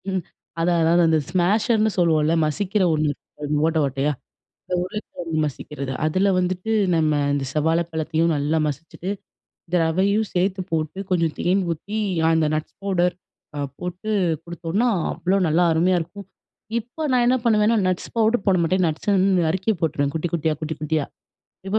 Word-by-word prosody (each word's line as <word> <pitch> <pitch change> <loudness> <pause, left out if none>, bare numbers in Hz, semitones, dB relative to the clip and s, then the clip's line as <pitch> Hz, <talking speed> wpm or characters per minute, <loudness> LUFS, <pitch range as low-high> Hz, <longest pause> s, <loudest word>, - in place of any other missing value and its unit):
ம். 190 -1 -1 0.4
அதான், 170 0 +2
அதான். 170 +2 +4
அந்த 160 -1 +4
ஸ்மாஷர்னு 215 +5 +2
சொல்லுவோம்ல, 160 -2 +3
மசிக்கிற 195 +6 0
ஒண்ணு, 155 -1 +1 0.6
ஓட்ட 165 0 +1
ஓட்டையா, 135 +2 0 0.7
உருளைக்கிழங்கு 180 -4 -5
மசிக்கிறது. 140 -1 -5
அதுல 185 +6 +2
வந்துட்டு 180 +3 -1 0.2
நம்ம 155 -2 +2 0.2
இந்த 140 -1 -1
செவ்வாழைப்பழத்தையும் 160 +1 +1
நல்லா 145 +3 0
மசிச்சிட்டு, 165 +5 -5 0.6
இந்த 180 +1 -1
ரவையும் 200 +6 +1
சேர்த்துப் 185 +1 0
போட்டு, 160 +2 -2
கொஞ்சம் 165 -3 +1
தேன் 190 +2 +2
ஊத்தி, 200 +7 -5 0.3
அந்த 160 -1 +3
நட்ஸ் 155 0 -4
பவுடர் 180 -3 +1 0.4
அ - - -2 0.2
போட்டு 180 +4 -5 0.3
குடுத்தோம்னா, 170 +7 -1 0.2
அவ்ளோ 185 +2 0
நல்லா 160 +3 +3
அருமையா 175 +3 +3
இருக்கும். 175 +4 -8 0.5
இப்ப 250 +7 -5
நான் 250 -1 +3
என்ன 255 +1 +4
பண்ணுவேன்னா, 220 0 +3
நட்ஸ் 185 -1 -2
பவுடர் 225 -2 +2
போடமாட்டேன். 185 -1 +2
நட்ஸ் 160 +5 -5
வந்து 190 -2 +3
நறுக்கி 190 +6 +1
போட்டுருவேன், 145 -3 0
குட்டி 160 +2 -1
குட்டியா, 160 -1 +1
குட்டி 160 0 -3
குட்டியா. 155 -1 -1 0.6
இப்ப 210 +3 +1
175 Hz, 145 wpm, -22 LUFS, 160-195 Hz, 0.7 s, அதான்